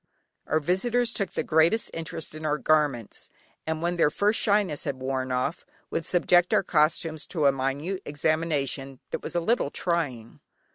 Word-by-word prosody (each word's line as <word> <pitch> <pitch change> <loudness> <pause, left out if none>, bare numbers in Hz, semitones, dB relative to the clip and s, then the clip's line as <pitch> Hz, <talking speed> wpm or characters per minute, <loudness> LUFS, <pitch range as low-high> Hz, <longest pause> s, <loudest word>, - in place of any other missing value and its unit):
Our 155 - +2
visitors 230 +9 +1
took 200 -4 -2
the - - -1
greatest 165 +8 +2
interest 160 -1 -6
in 155 0 -8
our 150 -1 +1
garments, 145 -8 0 0.4
and 160 0 -2
when 175 0 0
their 165 - +4
first 205 +7 +1
shyness 200 -8 +1
had 140 - -2
worn 130 0 -2
off, 130 +7 -1 0.3
would 165 - -2
subject 175 0 +3
our - - +3
costumes 160 -1 +1
to 155 -5 -1
a 140 - +7
minute 140 +8 -2
examination 145 -3 -1
that - - -3
was - - -6
a - - +3
little 220 - +1
trying. 145 -11 -2
155 Hz, 170 wpm, -26 LUFS, 140-175 Hz, 0.4 s, a